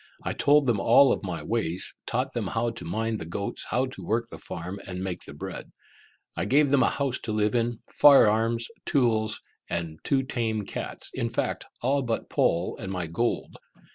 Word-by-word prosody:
I - - -2
told 145 0 +4
them 120 -5 +2
of - - -3
all 130 +3 +6
my 85 -6 -4
ways, 90 -3 0
taught 130 +2 -1
them 115 -5 -2
how 115 +3 0
to 110 -7 -8
mind 110 +5 -2
the - - -6
goats, 100 +5 -4
how 125 +3 +1
to 130 - -8
work 115 +2 0
the - - -8
farm, 90 +3 -6
and 90 0 -4
make 95 -2 -4
the - - -9
bread. - - -7 0.6
I 85 - -1
gave 140 +5 +3
them 140 -2 +5
a - - +4
house 135 -3 0
to 115 - -4
live 105 0 +1
in, 120 -1 0
fire 140 -6 +7
arms, 115 +2 +1 0.2
tools, 110 -6 +2 0.3
and 85 -1 -2
my 80 - -14
two 135 -1 +2
tame 115 -5 -2
cats, - - -5
in - - -1
fact, - - -2 0.2
all 140 +3 +2
but 120 -3 -3
Poll 85 +2 +1
and 95 -3 -5
my 90 -2 -2
gold. 100 +9 -2
115 Hz, 200 wpm, -27 LUFS, 95-125 Hz, 0.6 s, fire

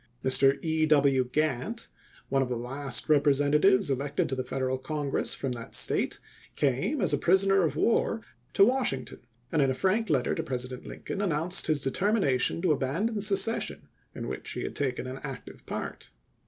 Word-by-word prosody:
Mr. 135 +1 +4
E. 160 -1 +1
W. 140 -4 +3
Glantt, 155 - -1 0.4
one 135 0 +1
of 130 - -1
the 125 - -2
last 135 +2 -1
Rep 150 -2 +4
resentatives 150 +8 +3
elected 140 +2 -1
to 135 - -2
the 130 - -3
Federal 130 0 -2
Congi'ess 145 0 -2
from 135 - -3
that 115 -2 -7
State, - - +1 0.4
came 140 - 0
as 185 -8 +2
a 145 - +1
prisoner 195 +4 +4
of 155 -5 0
war 225 +5 +1 0.3
to 195 - +5
Washing 240 - +1
ton, - - -10 0.3
and 160 - +2
in 135 - +3
a 130 - 0
frank 200 - +1
letter 135 -6 +1
to - - -2
President 125 -1 -5
Lincoln 200 - -6
announced 175 0 0
his 155 -3 +1
determination 165 - +1
to 180 - +3
abandon 170 - -1
secession 205 +2 +2 0.3
in - - -5
which - - -5
he - - -4
had - - -5
taken 130 -3 -2
an 130 +1 -6
active 135 -3 -9
part. - - -6
145 Hz, 180 wpm, -28 LUFS, 130-190 Hz, 0.4 s, to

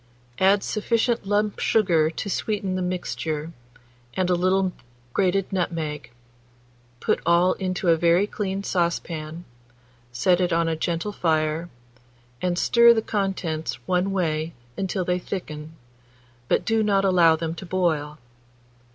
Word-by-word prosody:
Add 195 +1 +4
sufficient 230 0 0
lump 205 0 0
sugar 170 -8 +3
to 165 - -5
sweeten 200 -1 -2
the 185 - -1
mixture, 165 -3 -3 0.6
and 185 -1 +1
a - - +5
little 185 +1 +2 0.4
grated 195 0 +1
nutmeg; 160 -7 -2 0.9
put - - +1
all 170 +2 +4
into 185 -1 -3
a 165 -1 +5
very 170 +4 +3
clean 195 -2 -3
saucepan, 170 -2 -2 0.7
set 175 +10 +2
it 180 -1 +1
on 165 0 +2
a 165 - 0
gentle 170 +5 -2
fire, 160 -2 0 0.7
and 180 -1 0
stir 235 +4 +6
the 220 - 0
contents 190 -7 -2
one 185 +1 +1
way 165 -3 -1 0.2
until 190 -1 -2
they 180 0 0
thicken, 155 -5 -6 0.7
but - - +1
do 225 0 +2
not 200 -2 +2
allow 175 -4 +5
them 160 0 -3
to 190 - -8
boil. 160 -5 0
180 Hz, 135 wpm, -24 LUFS, 165-195 Hz, 0.9 s, stir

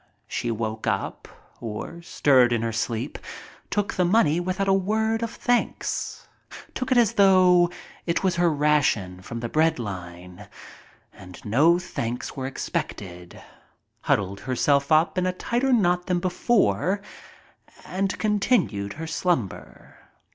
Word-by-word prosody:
She 120 - -3
woke 110 -1 -3
up, - - -2 0.3
or 115 +9 -6
stirred 130 -7 +3
in 115 -1 0
her 115 - -1
sleep, 115 0 -3 0.5
took 205 0 -1
the 180 - +1
money 175 -4 +3
without 185 +2 -2
a 195 - +4
word 220 +4 0
of 230 - -2
thanks 245 +2 -2 0.3
— - - -13
took 260 0 -4
it 255 - +4
as 235 -4 +4
though 185 -3 +5 0.4
it 170 +2 0
was 185 -2 +1
her 175 -1 +3
ration 140 -12 +1
from 115 +5 -7
the 120 - -2
bread 160 +6 +2
line 90 -2 -8 0.7
and 90 -2 -12
no 145 +11 +4
thanks 125 -9 -5
were 130 -1 -3
expected, 90 -8 -5 0.6
huddled 100 0 0
herself 140 +3 +1
up 160 +4 +3
in 185 - 0
a - - +1
tighter 245 +7 -1
knot 180 -7 +2
than 180 -2 +1
before, 185 - +1 0.9
and 195 +1 -2
con 210 -1 0
tinued 105 - 0
her 160 - -6
slumber. 160 - -3
160 Hz, 140 wpm, -24 LUFS, 115-190 Hz, 0.9 s, though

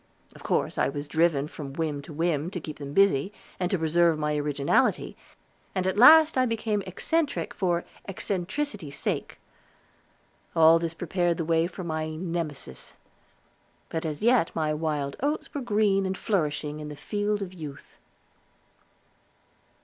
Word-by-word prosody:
Of - - -15
course - - -1
I - - +3
was 145 +1 -5
driven 155 -1 +2
from 145 -3 -8
whim 150 -2 -2
to 140 - -11
whim, 160 0 0
to 180 - -5
keep 155 -2 -8
them 140 -1 -6
busy, 190 0 +3 0.3
and 180 -1 0
to 190 - +1
preserve 165 0 +3
my 150 0 -1
originality, 145 -1 +1 0.6
and 185 -1 0
at 190 +2 0
last 315 +2 +8
I 255 - +3
became 220 -2 -1
eccentric 315 - -1
for 175 -3 0 0.2
eccentricity's 195 - -3
sake. - - -3 1.2
All 165 0 +7
this 165 -1 -3
prepared 175 0 0
the 165 - -2
way 165 +1 +2
for 185 +1 -8
my 155 -1 -3
Nemesis. 165 - -5 0.9
But 160 - -3
as 155 +2 -4
yet 235 -6 +4
my 155 -1 0
wild 150 -3 -2
oats 290 +4 -2
were 285 - -3
green 205 -4 +2
and 190 0 -3
flourishing 150 -6 -1
in 150 0 -6
the 150 - -7
field 205 +7 -2
of 185 -1 -8
youth. 150 -5 -10
165 Hz, 150 wpm, -27 LUFS, 150-195 Hz, 1.2 s, last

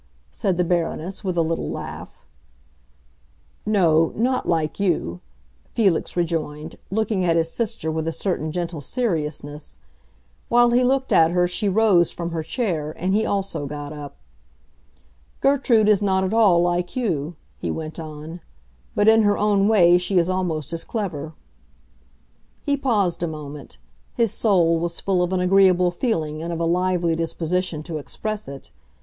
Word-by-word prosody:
said 190 -5 -1
the 180 - +2
Baroness, 175 +2 -2
with 185 -3 -2
a 165 - +4
little 165 +1 -2
laugh. - - -8 1.4
"No, 165 -6 +3
not 255 +3 0
like 160 -1 0
you," 160 - 0 0.6
Felix 195 -6 +1
rejoined, 160 -2 -2
looking 210 -1 0
at 170 -2 +2
his 165 0 +1
sister 225 -8 -2
with 160 0 -2
a - - 0
certain 160 -3 -2
gentle 170 -2 -4
seriousness. 150 - -3 0.7
While 240 0 +5
he 245 +1 +3
looked 265 +1 +1
at 160 0 +6
her 180 +1 +2
she 190 +4 -1
rose 195 -4 +4
from 170 -1 -5
her 165 -1 -2
chair, 160 - -2
and 185 +3 -1
he 220 +2 +2
also 195 -7 -2
got 145 +1 -6
up. 145 -2 -8 1.2
"Gertrude 260 -6 +3
is 210 -1 +4
not 190 -2 +1
at 190 +2 -1
all 210 -6 +5
like 175 0 -1
you," 175 - -2 0.2
he - - -3
went 160 0 -5
on; 155 +2 -8 0.5
"but 205 - +2
in 220 0 +7
her 205 -1 +2
own 205 -1 +2
way 180 -5 +5
she 180 +2 0
is 175 +1 +3
almost 170 -5 -2
as 165 - -2
clever." 160 -9 -4 1.3
He 285 - +1
paused 215 - 0
a 170 - 0
moment; 150 -2 -8 0.4
his 230 -4 +2
soul 170 -6 +3
was 170 0 -3
full 190 -2 0
of 180 0 0
an 185 - +1
agreeable 180 -1 +4
feeling 160 - -2
and 170 +1 -4
of 165 - -3
a 170 - 0
lively 175 -1 +1
disposition 165 0 -2
to 160 -2 -5
express 215 +8 -5
it. 140 -1 -10
175 Hz, 160 wpm, -22 LUFS, 160-205 Hz, 1.4 s, in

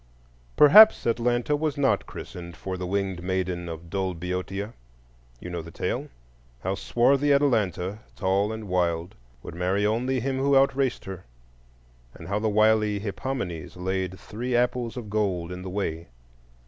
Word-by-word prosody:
Perhaps 210 +10 +8
Atlanta 120 +4 +1
was 150 -1 -1
not 140 -1 +1
christened 85 -4 -9
for 80 +9 -5
the 90 -1 -4
winged 95 -2 -2
maiden 90 -1 -2
of 80 +1 -8
dull 95 -2 -1
Boeotia; 90 +4 -4 0.7
you 90 - -8
know 85 -1 -3
the 80 - -10
tale,—how - - -6
swarthy 135 +8 +2
Atalanta, 105 - +1 0.2
tall 100 +3 +1
and 110 -1 -6
wild, 85 -2 0 0.3
would - - -8
marry 90 +4 0
only 125 +5 +1
him 130 +2 -2
who 140 +1 +3
out 135 -1 +4
raced 135 -3 -1
her; 95 -2 -8 0.9
and - - -10
how 100 +1 0
the 110 0 0
wily 110 0 +3
Hippomenes 100 - -4
laid 95 0 -2
three 120 +5 -4
apples 120 0 0
of 120 -4 -6
gold 95 -5 -1
in 90 0 -6
the 95 - -6
way. 85 -4 -3
100 Hz, 150 wpm, -26 LUFS, 90-120 Hz, 0.9 s, Perhaps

